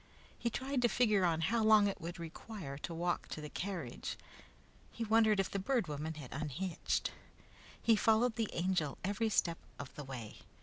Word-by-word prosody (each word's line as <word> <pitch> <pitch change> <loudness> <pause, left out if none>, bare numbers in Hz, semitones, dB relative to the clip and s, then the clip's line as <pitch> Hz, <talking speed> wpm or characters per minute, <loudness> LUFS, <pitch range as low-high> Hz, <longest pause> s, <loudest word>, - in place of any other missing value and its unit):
He 235 - -1
tried 265 +2 -1
to 240 - +5
figure 215 -5 +3
on 165 -2 +2
how 220 +7 +2
long 215 -1 +7
it 200 - -3
would 170 +2 -5
require 170 -1 -7
to 170 - -5
walk 175 +1 -1
to - - -5
the 150 -1 -7
carriage. 195 -2 -4 0.7
He 235 - -4
wondered 220 -1 +5
if 195 - +1
the 200 - -1
Bird 230 0 +1
Woman 155 +2 -3
had 145 -5 -8
unhitched. 155 +5 -1 0.7
He 230 - +5
followed 225 +2 +3
the 225 -2 0
Angel 170 -5 0
every 205 +4 +1
step 170 -5 +2 0.2
of 135 - -7
the 150 - -6
way. 125 -5 -7
190 Hz, 180 wpm, -35 LUFS, 160-220 Hz, 0.7 s, long